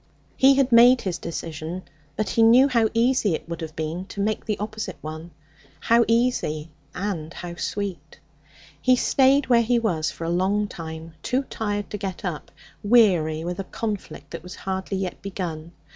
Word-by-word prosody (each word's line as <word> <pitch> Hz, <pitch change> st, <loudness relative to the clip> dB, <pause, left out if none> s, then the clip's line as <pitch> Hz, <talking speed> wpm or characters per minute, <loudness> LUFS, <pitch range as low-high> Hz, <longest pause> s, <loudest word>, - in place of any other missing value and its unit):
He 270 Hz, +1 st, +6 dB
had 270 Hz, -1 st, +2 dB
made 245 Hz, +2 st, +7 dB
his 185 Hz, -3 st, -3 dB
decision; 165 Hz, +2 st, -5 dB, 0.3 s
but 215 Hz, -, -1 dB
he 230 Hz, -, +1 dB
knew 240 Hz, +4 st, +7 dB
how 230 Hz, -5 st, +2 dB
easy 230 Hz, -5 st, +2 dB
it -, -, -8 dB
would 170 Hz, -1 st, -6 dB
have 160 Hz, -1 st, -6 dB
been 160 Hz, +4 st, -3 dB
to 200 Hz, -, -9 dB
make 210 Hz, +1 st, 0 dB
the 215 Hz, -2 st, -1 dB
opposite 210 Hz, -2 st, -5 dB
one. 155 Hz, +2 st, -7 dB, 0.5 s
How 235 Hz, 0 st, +4 dB
easy 230 Hz, -10 st, 0 dB, 0.2 s
and 180 Hz, -5 st, -3 dB
how 175 Hz, 0 st, -7 dB
sweet! 180 Hz, -8 st, -4 dB, 0.6 s
He 255 Hz, 0 st, +5 dB
stayed 270 Hz, +2 st, +3 dB
where 240 Hz, -2 st, +4 dB
he 240 Hz, +1 st, +2 dB
was 175 Hz, -9 st, 0 dB
for -, -, -8 dB
a 165 Hz, -, -2 dB
long 195 Hz, +4 st, +1 dB
time, 160 Hz, -2 st, -8 dB
too 255 Hz, -, 0 dB
tired 205 Hz, -2 st, -3 dB
to 210 Hz, -, -4 dB
get 195 Hz, -1 st, -5 dB
up, 170 Hz, -5 st, -4 dB, 0.3 s
weary 180 Hz, -9 st, +4 dB
with 175 Hz, +2 st, -4 dB
a -, -, -1 dB
conflict 190 Hz, -10 st, -5 dB
that 170 Hz, -, -6 dB
was 180 Hz, +2 st, -9 dB
hardly 190 Hz, 0 st, -3 dB
yet 190 Hz, -2 st, -4 dB
begun. 170 Hz, -5 st, -5 dB
195 Hz, 175 wpm, -24 LUFS, 165-230 Hz, 0.6 s, made